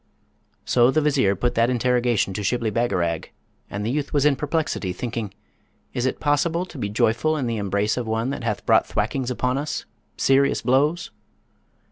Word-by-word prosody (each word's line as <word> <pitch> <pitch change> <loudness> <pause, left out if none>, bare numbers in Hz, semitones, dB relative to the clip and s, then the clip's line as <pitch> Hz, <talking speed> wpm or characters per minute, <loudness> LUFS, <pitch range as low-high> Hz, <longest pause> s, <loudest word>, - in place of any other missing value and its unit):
So 120 0 +4
the 155 - +2
Vizier 140 -10 +2
put 120 +5 -1
that 115 +1 +2
interrogation 120 -4 +1
to 105 - -4
Shibli 110 +2 0
Bagarag, 90 -8 0 0.4
and 105 +1 -4
the 115 - 0
youth 145 +1 -2
was 145 -1 +2
in 150 -2 +4
perplexity; 150 - -2
thinking, 115 -1 -4 0.6
'Is 125 +1 0
it - - -2
possible 165 +4 +1
to 165 -6 -11
be 105 - -2
joyful 120 +9 +1
in 135 - -1
the 115 -1 -1
embrace 100 +2 0
of 120 -2 -3
one 110 +4 -1
that 140 -4 -5
hath 115 -3 -2
brought - - +4
thwackings 130 -2 -1
upon 125 +1 -1
us, 150 +1 -4 0.3
serious 135 +1 +3
blows?' 145 +7 +1
125 Hz, 175 wpm, -23 LUFS, 110-140 Hz, 0.6 s, So